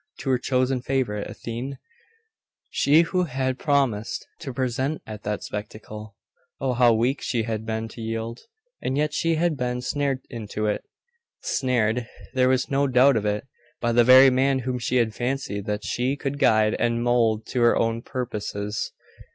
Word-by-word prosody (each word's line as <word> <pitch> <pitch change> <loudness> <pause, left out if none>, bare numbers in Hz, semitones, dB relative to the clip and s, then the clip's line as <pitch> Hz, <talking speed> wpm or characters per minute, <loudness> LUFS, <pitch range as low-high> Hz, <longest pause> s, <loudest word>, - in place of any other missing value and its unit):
To 135 - -1
her 125 - +2
chosen 130 0 +1
favourite, 125 -6 -1
Athene? 125 +4 -6 0.9
She 150 +4 +5
who 180 +2 0
had 130 -3 -2
promised 135 -8 0
to 165 -5 -6
be 125 - -7
present 130 +3 -1
at 110 -1 -8
that 105 0 -3
spectacle? 105 0 -7 0.4
Oh, 130 -2 0
how 120 -1 +5
weak 120 +5 +1
she 115 -3 -1
had 110 -1 -4
been 110 0 -2
to 115 - -10
yield! 115 +1 -4 0.4
And 130 - -1
yet 150 0 +1
she 165 +1 +1
had 165 0 +1
been 125 -2 -2
snared 140 0 -1
into 110 -3 -4
it. 105 -1 -1 0.6
Snared 120 -2 0 0.3
there 130 -1 +3
was 130 0 +2
no 140 -1 +1
doubt 130 +1 +5
of 105 -2 0
it 105 +2 -1 0.3
by 120 - 0
the 120 +1 +5
very 130 +2 +8
man 135 +1 +2
whom 125 -1 -1
she 120 +1 -2
had 115 -3 +2
fancied 120 -5 -3
that 105 0 -2
she 125 +3 0
could 140 0 -4
guide 110 -3 +4
and 120 0 +1
mould 115 -3 +2
to 125 - 0
her 120 - +5
own 115 0 0
purposes. 105 -5 -4
125 Hz, 175 wpm, -24 LUFS, 110-135 Hz, 0.9 s, very